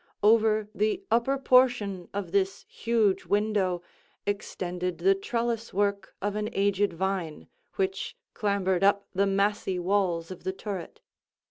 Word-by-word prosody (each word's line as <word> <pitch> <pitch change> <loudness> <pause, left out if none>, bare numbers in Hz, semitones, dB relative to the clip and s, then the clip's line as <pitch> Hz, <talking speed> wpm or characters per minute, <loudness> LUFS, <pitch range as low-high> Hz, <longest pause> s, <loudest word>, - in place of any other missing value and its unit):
Over 215 0 +4
the 215 - 0
upper 240 +4 +2
portion 245 -8 +3
of 195 -4 -4
this 195 0 0
huge 225 -4 +1
window, 200 -4 +1 0.4
extended 180 -3 -3
the 390 - +4
trellice 235 - -2
work 200 -1 0
of 205 0 -1
an 210 0 -1
aged 200 0 +2
vine, 175 -3 -3 0.3
which 195 0 -2 0.2
clambered 195 -3 0
up 200 0 +4
the 200 +1 +2
massy 195 -1 +1
walls 180 -2 0
of 185 - -9
the 190 - -2
turret. 190 -3 -6
200 Hz, 130 wpm, -28 LUFS, 190-215 Hz, 0.4 s, Over